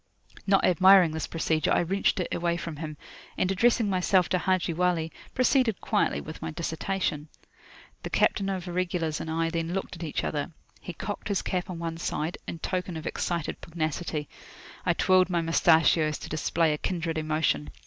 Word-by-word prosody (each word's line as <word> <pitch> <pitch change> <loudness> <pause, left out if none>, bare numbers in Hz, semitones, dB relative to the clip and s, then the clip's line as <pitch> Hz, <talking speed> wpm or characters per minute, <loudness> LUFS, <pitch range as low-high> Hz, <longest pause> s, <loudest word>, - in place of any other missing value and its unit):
Not 195 0 +4
admiring 185 -1 +6
this 160 0 -3
procedure, 160 -2 0
I - - +4
wrenched 195 +3 +1
it 180 - -2
away 170 0 0
from 170 -3 -6
him, 155 -1 -6 0.4
and, 185 - +1
addressing 230 +3 +3
myself 185 -1 +2
to 185 - +1
Haji 185 -2 +1
Wali, 170 -1 0 0.2
proceeded 255 -4 +2
quietly 210 - +1
with 155 - -9
my 160 - -3
dissertation. 160 -1 -2 0.7
The - - -5
captain 195 -2 +2
of 185 -2 -3
Irregulars 175 -3 -1
and 160 - -5
I 165 +1 0
then 165 0 -2
looked 195 - -4
at 170 - -8
each 155 - -2
other. 150 +2 -3 0.3
He 180 - -7
cocked 205 +5 -5
his 200 -3 0
cap 180 -1 -2
on 180 - -5
one 165 -1 -4
side, 160 0 -3
in - - -4
token 180 0 -3
of 160 - -7
excited 170 -2 -3
pugnacity. 155 -2 -3 0.6
I - - +4
twirled 185 0 +3
my 175 -2 +1
moustachios 160 -2 +3
to - - -9
display 155 +1 +1
a 150 - -4
kindred 165 -3 -2
emotion. 155 - 0
170 Hz, 180 wpm, -27 LUFS, 160-185 Hz, 0.7 s, admiring